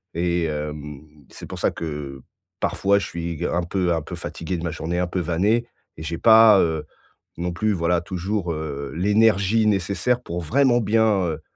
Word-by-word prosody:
et 85 0 0
hem, 75 -2 -5 0.3
c'est - - -10
pour - - -8
ça - - +2
que 75 -4 -6 0.4
parfois 100 +1 +2
je 95 - -4
suis 85 -1 -4
un 85 0 0
peu 90 0 0
un 80 - -1
peu - - -7
fatigué 85 +2 -5
de 85 - -6
ma 85 - -2
journée 85 +2 -3
un 90 - 0
peu 90 - -2
vanné 95 +8 +1 0.3
et 80 - -7
j'ai 85 +2 -4
pas, 110 -1 +7
heu, 80 -3 0 0.5
non 90 +1 -2
plus, 110 +5 0
voilà, 85 -1 +1
toujours, 90 +1 -3
heu, 70 -3 -5
l'énergie 105 +2 +3
nécessaire 100 +5 0
pour 85 -7 -5
vraiment 120 - +3
bien, 110 -1 +2
heu 80 -2 -4
85 Hz, 180 wpm, -23 LUFS, 80-105 Hz, 0.5 s, pas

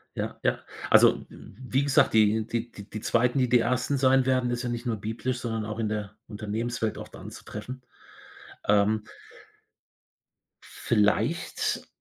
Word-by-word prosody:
Ja, - - -4
ja. - - +1 0.3
Also, - - +6
w - - -13 0.2
wie 135 +2 +4
gesagt, 140 -1 +3
die 110 0 +4
die 115 0 -3 0.2
die 110 - -5
2., 120 +4 +2
die 125 - +3
die 125 +1 +5
1. 125 +4 0
sein 130 0 +4
werden, 130 -1 +2
ist 120 +1 -2
ja 125 - -2
nicht 120 +1 -4
nur 115 -3 -1
biblisch, 115 +4 -3
sondern 115 -3 -3
auch 110 +1 -5
in 110 - 0
der 105 -1 -4
Unternehmenswelt 110 +1 -3
oft - - -9
anzutreffen. 130 +1 -8 0.9
Ähm. 105 +1 +3 1.6
Vielleicht - - 0
115 Hz, 145 wpm, -27 LUFS, 110-125 Hz, 1.6 s, Also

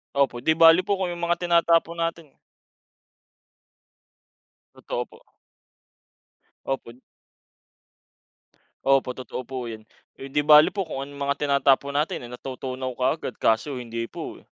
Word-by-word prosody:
Opo, 135 -3 +1
'di 160 - +3
bale 165 +2 +7
po 200 0 -1
kung 185 - 0
yung 175 0 -5
mga 170 0 +1
tinatapon 170 -1 +2
natin 165 -1 -3 2.5
Totoo - - -4
po. - - -19 1.5
Opo. 130 -2 -5 1.8
Opo, 135 -2 +3
totoo 130 0 -7
po 125 -2 -5
'yon. 110 -1 -9 0.3
Eh, - - -8
'di 150 +2 +1
bale 150 +2 +7
po 200 - -1
kung 135 -4 -5
anong 140 0 -11
mga 140 - +1
tinatapon 140 0 +2
natin 145 -3 -1
ay - - -11
natutunaw 130 0 -5
kaagad 130 +1 -1
kaso 120 +5 +1
hindi 115 -1 -5
po, - - -8
eh. - - -24
140 Hz, 130 wpm, -24 LUFS, 130-165 Hz, 2.5 s, bale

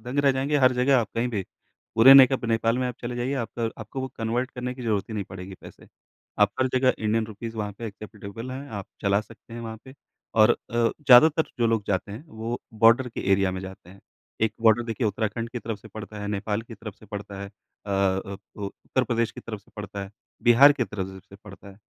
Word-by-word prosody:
दंग 125 +5 -5
रह 135 - +5
जाएँगे, 135 +3 0
हर 130 -2 +5
जगह 130 +2 +4
आप 110 -4 -1
कहीं 115 +2 0
भी, 105 -5 -2 0.5
पूरे 125 +4 +9
नेकप 135 -2 +7
नेपाल 115 +1 +1
में 130 - 0
आप 125 - -5
चले 120 0 -4
जाइए, 125 +3 -1
आपका 120 -2 -3
र - - -3
आपको 135 - -6
वो 130 - -3
कन्वर्ट 120 +3 -1
करने 125 0 -4
की 125 - -9
ज़रूरत 105 -5 0
ही 110 - -6
नहीं 100 - -2
पड़ेगी 95 0 -8
पैसे। - - -14 0.5
आप 105 -1 +6
हर 130 - +4
जगह 130 0 +4
इंडियन 110 +1 0
रुपीज़ 115 +2 -7
वहाँ 105 -1 -3
पे 115 - -5
एक्सेप्टेबल 105 +2 -8
हैं, 135 +2 -7
आप 100 -6 -6 0.2
चला 100 0 +3
सकते 115 +1 -14
हैं 120 - -6
वहाँ 110 -1 -6
पे। 130 0 -13 0.4
और 110 0 +6
अ, - - +5 0.2
ज़्यादातर 140 +6 +5
जो 120 - +3
लोग 115 -2 +1
जाते 100 +1 -1
हैं, 115 +9 -9
वो 115 0 -5
बॉर्डर 115 +3 +5
के - - -6
एरिया 95 -1 +3
में 95 - -4
जाते 95 -2 -10
हैं, 100 - -16 0.4
1 110 - +2
बॉर्डर 115 +1 +5
देखिए 115 0 -2
उत्तराखंड 110 +3 -2
की 120 - -4
तरफ 115 -2 -5
से 110 - -14
पड़ता 105 0 -8
है, 105 - -4
नेपाल 105 +1 -2
की 115 0 -11
तरफ 105 -1 -9
से 110 - -16
पड़ता 100 -1 -7
है, 100 - -7 0.4
अ - - -5
अ, 95 0 0 0.2
उ 105 - -7
उत्तर 130 +5 -2
प्रदेश 115 -1 0
की - - -9
तरफ 110 -3 -7
से - - -27
पड़ता 100 -1 -6
है, 95 - -12 0.3
बिहार 130 +5 +8
की 135 -4 -1
तरफ 95 -2 -4
से 95 0 -10
भी 95 +1 -16
पड़ता 100 0 -12
है, 100 0 -14
115 Hz, 240 wpm, -25 LUFS, 100-125 Hz, 0.5 s, पूरे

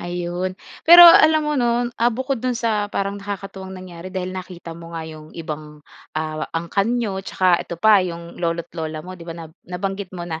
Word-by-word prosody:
Ayun 175 +1 -3 0.3
pero 345 +1 +11
alam 315 -2 +8
mo 300 - 0
'no, 240 0 +2 0.2
ah, 235 - +5
bukod 260 +1 -2
dun 250 -2 -1
sa 215 -3 0
parang 200 0 -3
nakakatuwang 195 -1 -7
nangyari 185 -1 -9
dahil 185 -1 -4
nakita 180 -2 -8
mo 165 0 -9
nga 160 - -4
'yong 155 -1 -10
ibang, 150 -2 -7 0.3
ah, 155 0 -3
angkan 195 +5 0
niyo 205 -5 -2
tsaka 185 -2 +2
ito 170 - -6
pa, 210 +3 +5
'yong 170 -1 -6
lolo't 170 -1 -2
lola 155 -1 -5
mo 185 - -8
'di 175 -2 -11
ba, 165 - -6
na 165 - -8 0.2
nabanggit 195 +2 -4
mo 175 - -5
na 165 -2 -5
185 Hz, 195 wpm, -21 LUFS, 170-205 Hz, 0.3 s, pero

